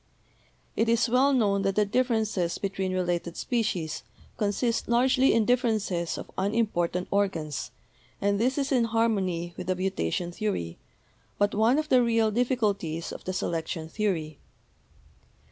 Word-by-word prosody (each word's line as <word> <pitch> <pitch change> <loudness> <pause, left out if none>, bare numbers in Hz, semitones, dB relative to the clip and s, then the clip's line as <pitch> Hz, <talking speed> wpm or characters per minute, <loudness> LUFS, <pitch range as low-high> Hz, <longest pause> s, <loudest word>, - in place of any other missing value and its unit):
"It 225 - +1
is 235 +2 +3
well 260 +4 +4
known 205 -7 +2
that 195 0 0
the 210 - +3
differences 220 -6 0
between 195 -1 -2
related 175 -2 -2
species 205 - -1 0.3
consist 225 +3 0
largely 255 +3 +4
in 225 -2 +3
differences 215 -8 0
of - - -8
unimportant 190 -4 0
or 200 0 +3
gans, 155 -6 -5 0.5
and 200 0 +1
this 255 +5 +1
is 275 0 -1
in 250 -3 +3
harmony 195 -7 0
with 180 - -6
the 185 - +1
mutation 175 - -2
theory, 175 - -3 0.6
but 205 0 +2
one 225 +6 +3
of 310 0 -1
the 255 -1 +5
real 230 -2 +2
difficulties 205 -9 -1
of - - -9
the 185 - -2
selection 165 -2 -3
theory. 160 -6 -2
205 Hz, 145 wpm, -27 LUFS, 175-230 Hz, 0.6 s, the